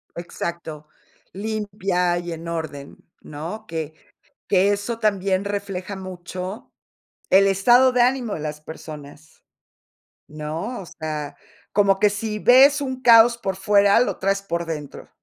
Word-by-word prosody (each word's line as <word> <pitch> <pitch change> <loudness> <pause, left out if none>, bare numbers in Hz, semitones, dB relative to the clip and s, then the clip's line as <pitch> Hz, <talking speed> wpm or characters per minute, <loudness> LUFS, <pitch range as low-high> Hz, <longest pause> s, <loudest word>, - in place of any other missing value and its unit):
Exacto, 170 -3 -6 0.5
limpia 195 -4 -1
y 175 0 -5
en 165 +1 -8
orden, 155 -4 -6 0.2
¿no? 165 +9 -7
Que 160 -2 -5 0.6
que 200 +1 +3
eso 205 +3 -3
también 195 -3 0
refleja 200 -1 -4
mucho 185 +1 -7 0.6
el 195 +1 +6
estado 240 +7 +5
de 250 - +2
ánimo 245 -3 +1
de - - -4
las 150 0 -5
personas, 155 -1 -11 0.8
¿no? 160 +10 -5
O - - -8
sea, 155 -2 -6 0.4
como 195 -1 +3
que 210 +1 +4
si 210 +1 -4
ves 275 +5 +6
un 260 -2 -4
caos 235 0 +6
por 195 -4 -3
fuera, 200 +2 +4
lo 250 - 0
traes 195 +1 0
por 170 -3 -3
dentro. 150 -3 -7
195 Hz, 135 wpm, -22 LUFS, 165-215 Hz, 0.8 s, el